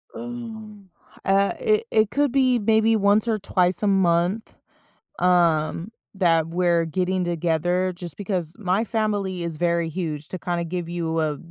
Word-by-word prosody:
Um, 220 -4 -8 0.4
uh, 195 +1 +3
it 440 -2 +2
it 215 -1 +3
could 285 -2 +1
be 255 -3 +3
maybe 220 +1 +3
once 205 +2 +3
or 220 -2 0
twice 185 -1 0
a 210 - +3
month, 190 +2 +1 0.6
um, 175 +1 +2 0.2
that 165 -4 +2
we're 170 -1 +1
getting 185 +2 -1
together, 175 +2 0
just 175 -3 -8
because 185 -5 -3
my 195 +2 +1
family 205 -5 -2
is 165 -2 -4
very 170 -1 0
huge; 155 -3 -4
to 185 - -6
kinda 175 0 -2
give 170 0 -4
you 165 -2 -2
a 150 -2 -1
185 Hz, 150 wpm, -23 LUFS, 170-215 Hz, 0.6 s, uh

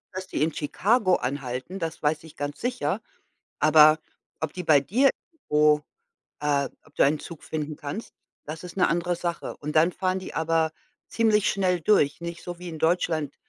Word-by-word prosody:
dass 185 0 -5
die 150 - -1
in 160 0 0
Chicago 185 - +2
anhalten, 130 +6 -4
das 165 -2 -4
weiß 150 +1 +1
ich 160 - -14
ganz 145 0 -5
sicher, 245 0 -1 0.6
aber 155 0 +7 0.4
ob 160 -2 -3
die 180 - -5
bei 155 -4 +6
dir 250 - +3 0.2
irgendwo 150 - +2 0.6
äh, 145 -2 +1 0.2
ob 155 - -23
du - - +4
einen 150 +2 +3
Zug 165 0 -10
finden 155 -1 -4
kannst, 150 +9 -6 0.3
das 155 +3 -7
ist 180 -1 -9
'ne 185 - +4
andere 175 +1 0
Sache. 170 0 -4
Und 150 +1 -6
dann 160 +3 +5
fahren 185 0 -1
die 185 - -8
aber 160 0 +1 0.4
ziemlich 215 -2 +2
schnell 185 -3 +1
durch 155 -6 +3
nicht 170 0 -6
so 175 -1 -6
wie 180 0 -7
in 160 -2 -7
Deutschland, 160 -3 0
160 Hz, 180 wpm, -26 LUFS, 150-180 Hz, 0.6 s, aber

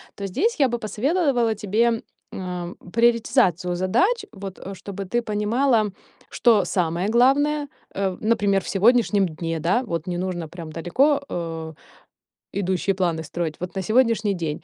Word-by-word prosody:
то 200 - -4
здесь 385 - 0
я 275 - +5
бы 240 -1 -2
посоветовала 240 - +1
тебе, 225 +3 +1 0.3
м, 180 -1 -5 0.2
приоритизацию 230 - +2
задач, 370 - +1
вот 195 -2 -8
чтобы 195 +1 -7
ты 240 +6 0
понимала, 220 +1 +1 0.4
что 220 -6 +3
самое 175 +1 0
главное. 285 +5 +3 0.3
Э, 190 -2 -1
например, 205 -3 +2
в - - -9
сегодняшнем 210 -1 +3
дне, 165 0 -4
да, 190 +10 +2
вот 170 -6 -4
не 175 - -2
нужно 175 -3 -3
прям 165 -2 -8
далеко, 275 - +2
э, 165 -2 -4 0.8
идущие 190 0 0
планы 170 -4 0
строить, 160 0 -3
вот 180 +2 -6
на 190 - -1
сегодняшний 220 -2 +2
день. 160 -5 -4
200 Hz, 145 wpm, -23 LUFS, 175-235 Hz, 0.8 s, я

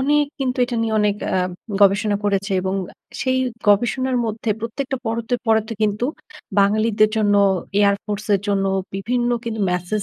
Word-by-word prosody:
অনেক 295 +2 +3 0.2
কিন্তু 255 -1 -1
এটা 245 -1 -4
নিয়ে 225 -1 -1
অনেক 210 -1 +2 0.2
আ - - +2 0.4
গবেষণা 205 +1 +4
করেছে 200 0 0
এবং 190 +1 -2 0.2
আ - - -24 0.3
সেই 260 -1 +1 0.3
গবেষণার 250 +5 +2
মধ্যে 220 0 -2
প্রত্যেকটা 265 +4 -3
পরতে, 230 +2 -1
পরতে 220 0 +2
কিন্তু 210 +2 +1 0.6
বাঙালিদের 215 +1 +3
জন্য 205 -2 +3 0.5
air 200 0 +4
force 210 0 -5
এর 195 - +1
জন্য 195 -1 +1 0.3
বিভিন্ন 240 +5 -1
কিন্তু 220 -2 -3
মেসেজ 180 +4 -1
215 Hz, 155 wpm, -21 LUFS, 205-240 Hz, 0.6 s, গবেষণা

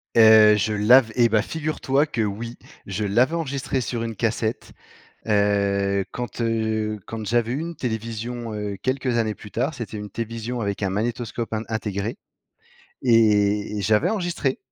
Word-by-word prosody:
Heu, 110 -1 +8
je 105 +1 0
l'av 110 +3 +5
et 120 -2 +5
bah 110 -1 +2
figure 155 +3 -4
toi 140 +3 +2
que 120 -6 -3
oui, 110 +3 -3 0.3
je 100 +2 -3
l'avais 120 +10 +2
enregistré 140 -5 -2
sur 115 0 -3
une 115 -1 -4
cassette, 110 +1 -2 0.5
heu, 100 -1 +2
quand, 120 -1 -5
heu, 110 -2 -1
quand 110 -1 -6
j'avais 120 0 +1
eu 135 - -1
une 170 0 -5
télévision, 115 0 -4
heu, 105 -1 -4
quelques 130 -2 0
années 110 -2 0
plus 105 - -12
tard, 135 +7 -1
c'était 115 -4 -6
une 105 0 -6
télévision 115 +1 -4
avec 100 -1 -3
un 95 - 0
magnétoscope 115 +2 -3
in 110 - -1
intégré, 105 0 -3 0.8
et- 105 -3 +3
et - - -2
j'avais 105 +2 +2
enregistré. 175 -10 -1
115 Hz, 165 wpm, -23 LUFS, 105-120 Hz, 0.8 s, Heu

